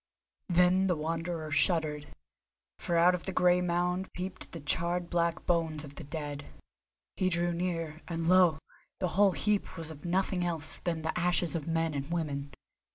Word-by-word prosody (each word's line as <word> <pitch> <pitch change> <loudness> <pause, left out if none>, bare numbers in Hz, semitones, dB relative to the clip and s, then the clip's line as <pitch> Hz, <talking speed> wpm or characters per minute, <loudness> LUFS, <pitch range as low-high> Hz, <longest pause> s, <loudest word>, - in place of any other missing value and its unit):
Then 180 +2 +4
the 180 - +2
Wanderer 165 0 -3
shuddered, 150 -2 +1 0.7
for 170 - 0
out 175 +2 +6
of 180 - -3
the 190 - -2
grey 180 -1 +4
mound 180 +1 0
peeped 185 +1 -6
the 165 - -6
charred 170 +4 -1
black 170 -1 0
bones 160 -3 0
of 145 -2 -10
the - - -9
dead. 145 -1 -6 0.7
He 185 - +2
drew 175 0 +1
near, 165 -3 -3
and, 165 -1 -2
lo! 180 -3 +6 0.4
the 180 - 0
whole 200 +1 +4
heap 205 -2 -1
was 160 -1 -5
of 150 -2 -11
nothing 185 +1 0
else 165 -3 -2
than 165 -2 -2
the 160 - -2
ashes 175 -1 +2
of 160 -2 -3
men 165 -1 0
and 140 +1 -4
women. 145 -4 -2
170 Hz, 170 wpm, -30 LUFS, 160-180 Hz, 0.7 s, out